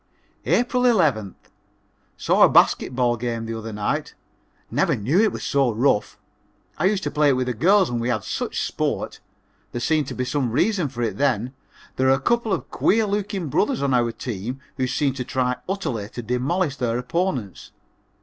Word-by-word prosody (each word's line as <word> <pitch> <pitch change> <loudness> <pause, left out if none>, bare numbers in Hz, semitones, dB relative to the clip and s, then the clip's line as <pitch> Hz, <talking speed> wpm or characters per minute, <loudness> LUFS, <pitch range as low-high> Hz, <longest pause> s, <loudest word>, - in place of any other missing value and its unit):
April 250 +1 +2
11th. 155 - +2 0.8
Saw - - +1
a - - +8
basket 125 - +3
ball 120 -2 +2
game 115 -1 -3
the 115 0 -4
other 110 0 -6
night. 105 -1 -2 0.6
Never - - +2
knew 135 - +2
it 220 - +3
was - - -6
so 135 -3 +2
rough. 115 -1 +1 0.6
I 165 - +1
used 195 0 +1
to 145 - -2
play 150 0 +3
it - - +4
with 130 0 0
the 125 - -1
girls 190 - +4
and 120 -1 -2
we 120 - -1
had 110 -5 -1
such - - -3
sport. - - -3 0.5
There 120 - -2
seemed 150 +2 +1
to - - -6
be 125 - -2
some 130 -1 -1
reason 170 - +1
for 120 -2 -4
it 115 - -2
then. 130 -3 0 0.4
There 130 - +2
are 135 - +6
a - - -7
couple 235 - 0
of 185 - -2
queer 225 +1 +2
looking 200 -4 -2
brothers 220 - +1
on 135 -2 +1
our 120 -2 +2
team 120 +2 -5 0.2
who 130 -1 0
seem 135 +1 0
to 130 -1 -4
try 125 0 -1
utterly 120 - -3
to 120 - -7
demolish 140 - -1
their 120 -3 -1
opponents. 125 - -3
130 Hz, 190 wpm, -23 LUFS, 120-175 Hz, 0.8 s, a